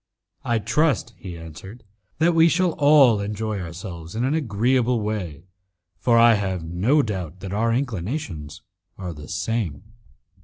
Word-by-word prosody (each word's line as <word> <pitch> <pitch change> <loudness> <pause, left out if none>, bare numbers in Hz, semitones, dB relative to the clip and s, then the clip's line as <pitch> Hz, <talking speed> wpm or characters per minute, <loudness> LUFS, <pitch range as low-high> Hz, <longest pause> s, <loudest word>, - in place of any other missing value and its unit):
"I 120 - +1
trust," 135 0 +1
he 90 -4 -8
answered, 85 +8 -11 0.3
"that 165 +3 +3
we 165 0 +5
shall 150 - +4
enjoy 105 0 -3
ourselves 85 0 -8
in 115 - -1
an 135 +3 +1
agreeable 125 -2 +1
way, 95 -8 -4 0.6
for 115 +3 +3
I 115 0 +7
have 95 -5 -1
no 100 - +2
doubt 95 - -5
that 95 0 -6
our 115 +3 +1
inclinations 105 - -3 0.3
are 90 -3 -5
the 75 -1 -11
same." 95 -4 -2
105 Hz, 140 wpm, -23 LUFS, 90-125 Hz, 0.6 s, I